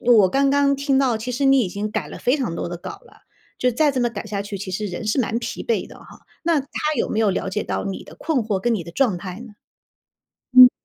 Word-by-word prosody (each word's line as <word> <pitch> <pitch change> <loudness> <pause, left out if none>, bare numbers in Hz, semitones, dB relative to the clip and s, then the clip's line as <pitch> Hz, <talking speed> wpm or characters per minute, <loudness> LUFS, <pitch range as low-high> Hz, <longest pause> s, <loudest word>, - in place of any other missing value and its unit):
我 230 -6 +5
刚 275 +7 +2
刚 280 0 +3
听 275 -1 +1
到， 255 -5 +2
其 230 +3 -5
实 270 +3 -1
你 270 -1 +6
已 200 - 0
经 205 +3 -4
改 - - -3
了 - - -8
非 255 +4 +2
常 235 - -2
多 - - -3
的 175 - -5
稿 175 - -8
了。 - - -20 0.4
就 250 - +2
再 285 +4 +2
这 260 - -1
么 240 - +2
改 225 -2 -6
下 205 -1 -3
去， 200 0 -5
其 190 0 -6
实 210 +3 -2
人 185 +3 -5
是 215 +5 +2
蛮 230 -1 0
疲 - - -5
惫 470 - 0
的 - - -13
吼， - - -15 0.4
那 330 -3 +3
他 275 - -11 0.3
有 - - 0
没 215 - -1
有 220 - +3
了 190 - -2
解 210 +2 -1
到 - - -3
你 195 - -4
的 - - -13
困 320 -4 0
惑 210 -3 -1
跟 235 +4 +1
你 190 - -2
的 170 - -9
状 210 -2 +1
态 180 0 -6
呢？ 240 -3 -10 1.0
嗯， 255 0 +11
230 Hz, 295 characters per minute, -22 LUFS, 200-270 Hz, 1.0 s, 嗯